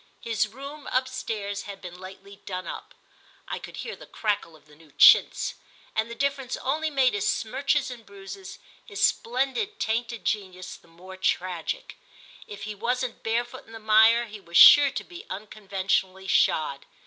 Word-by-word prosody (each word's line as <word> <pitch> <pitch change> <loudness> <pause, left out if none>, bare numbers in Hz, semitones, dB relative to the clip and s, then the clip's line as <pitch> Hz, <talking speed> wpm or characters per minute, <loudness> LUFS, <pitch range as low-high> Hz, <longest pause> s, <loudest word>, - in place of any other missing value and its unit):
His 225 -2 0
room, 275 +6 -9
upstairs, 225 -6 -2
had 195 -1 -7
been 180 -1 -10
lately 195 +1 -11
done 185 -1 -6
up - - -8 0.5
(I - - -4
could - - -10
hear - - -5
the - - -14
crackle 205 -6 -2
of 155 - -21
the 150 -1 -19
new 155 -1 -20
chintz) - - +6 0.4
and 220 +1 0
the 235 - -7
difference 275 -1 -2
only 310 +4 -1
made 265 -4 +2
his 205 -1 -1
smirches 270 +4 0
and 240 -2 -10
bruises, 200 - -10 0.3
his 415 -3 +1
splendid 270 - -1
tainted 230 +1 -2
genius, 185 -3 -3
the - - -20
more 185 +3 -13
tragic. 185 - -2 0.5
If 205 - -9
he 215 - -4
wasn't 245 +3 -2
barefoot 240 +3 -3
in 225 - -14
the - - -7
mire 220 +2 +5
he 215 -2 -10
was 170 -3 -2
sure 290 -1 +10
to 270 - -5
be 355 +4 -12
unconventionally 190 -2 -2
shod. 150 -6 +1
220 Hz, 165 wpm, -26 LUFS, 190-255 Hz, 0.5 s, sure